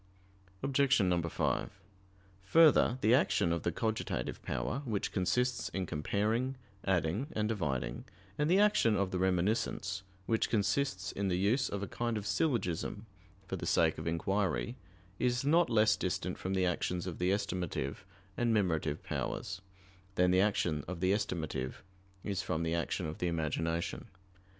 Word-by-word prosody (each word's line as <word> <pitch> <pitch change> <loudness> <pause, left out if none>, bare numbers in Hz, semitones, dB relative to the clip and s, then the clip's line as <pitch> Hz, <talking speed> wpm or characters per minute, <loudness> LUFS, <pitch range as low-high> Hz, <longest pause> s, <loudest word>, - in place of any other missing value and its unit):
Obj. 135 -9 +3 0.2
5: - - 0 0.7
Further, 150 +1 +5
the 110 - +4
action 90 - +3
of 85 - -1
the 85 - 0
cogitative 110 +4 -2
power, 60 - -2
which 110 -7 -2
consists 125 +7 0
in 95 -1 -2
comparing, 105 - 0 0.3
adding 95 - 0
and 105 -1 0
dividing, 70 - -2 0.3
and 150 +1 0
the 185 - +5
action 205 - +4
of 100 -1 0
the 90 - -1
reminiscence, 95 +1 0 0.2
which 110 +2 +1
consists 100 -1 0
in 100 0 -2
the 90 -1 +1
use 110 +8 +2
of 100 0 -3
a - - -3
kind 120 -1 -2
of 105 - -5
syllogism 105 - -1 0.4
for - - -4
the - - -5
sake - - +3
of - - -5
inquiry, 95 +7 0 0.4
is 125 +2 +1
not 165 +3 +4
less 110 -1 +4
distant - - -2
from 95 +1 -3
the 95 -1 +2
actions 90 0 -1
of 90 -3 -5
the 90 +1 +1
estimative 90 -8 -1 0.4
and 120 -1 +1
memorative 80 -8 0
powers, 95 -1 -3 0.5
than 90 0 +4
the 90 +1 +5
action 85 -7 +1
of 90 -1 -5
the 95 +1 +2
estimative 80 -10 -2 0.4
is 100 -2 -2
from 85 -3 -2
the 80 0 0
action 85 +1 -1
of 75 0 -5
the 90 - 0
imagination. 80 0 -2
95 Hz, 155 wpm, -32 LUFS, 85-115 Hz, 0.7 s, Further